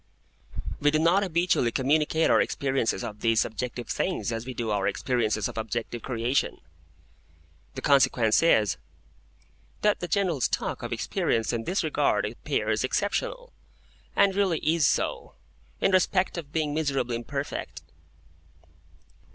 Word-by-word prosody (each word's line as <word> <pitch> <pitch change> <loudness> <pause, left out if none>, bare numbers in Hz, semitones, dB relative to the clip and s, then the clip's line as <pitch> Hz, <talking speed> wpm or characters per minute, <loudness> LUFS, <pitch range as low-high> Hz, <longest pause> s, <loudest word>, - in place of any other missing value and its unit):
We 145 - +3
do 155 - +2
not 170 +5 +3
habitually 170 -9 +1
communicate 150 +5 +2
our - - +5
experiences 135 -7 -1
of 105 0 -6
these 115 0 +2
subjective 120 +2 -4
things 180 -9 -1
as 115 +1 -4
we 130 - -5
do 115 -2 -2
our 100 -2 0
experiences 110 -5 0
of - - -6
objective 115 +1 -4
creation. 125 +2 -1 1.2
The - - -6
consequence 125 -5 +4
is, 110 -11 +3 1.1
that 210 -1 +3
the 175 - -4
general 175 -5 0
stock - - -1
of - - -5
experience 115 +1 -1
in 115 -1 -2
this 190 - 0
regard - - +1
appears - - -1
exceptional, - - -2 0.6
and 200 -1 +4
really 190 -4 +1
is 160 -1 +3
so, - - -1 0.4
in 195 - +2
respect 185 0 +2
of 160 -5 -6
being 155 -2 -1
miserably 135 -6 -1
imperfect. 140 +4 -5
140 Hz, 135 wpm, -27 LUFS, 115-170 Hz, 1.2 s, our